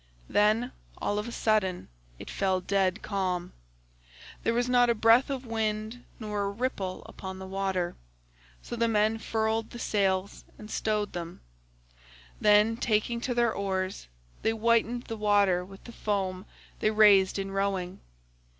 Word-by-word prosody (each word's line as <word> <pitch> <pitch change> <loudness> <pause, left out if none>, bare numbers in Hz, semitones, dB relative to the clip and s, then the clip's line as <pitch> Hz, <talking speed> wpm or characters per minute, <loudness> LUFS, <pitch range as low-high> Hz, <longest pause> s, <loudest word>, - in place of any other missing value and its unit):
Then 215 +4 +3 0.3
all 205 - -1
of 210 - -4
a - - -5
sudden 210 -6 0 0.3
it - - -10
fell 190 -1 +1
dead 190 +2 0
calm; 185 -3 -2 0.9
there 230 - 0
was 245 +1 +1
not 245 -1 +4
a 235 - +3
breath 230 +5 +5
of 265 -2 -3
wind 220 +1 -2 0.2
nor 210 -2 -3
a - - -1
ripple 200 -4 -3
upon 190 -1 -8
the 190 - -7
water, 190 -2 -2 0.7
so - - -5
the 230 0 +1
men 220 0 +2
furled 220 0 -1
the 240 - -9
sails 195 -3 0
and 215 0 -10
stowed 210 -1 -1
them; 170 -1 -6 1.0
then 210 +2 +4
taking 235 0 0
to 245 0 -2
their 235 -2 +2
oars 190 - -3 0.3
they - - +2
whitened 230 +2 +1
the 225 - -6
water 205 -4 +3
with 195 +1 -13
the 235 - -10
foam 195 -4 -2 0.3
they 215 - +2
raised 205 -3 +5
in 195 0 -3
rowing. 195 -2 -2
210 Hz, 150 wpm, -28 LUFS, 190-225 Hz, 1.0 s, breath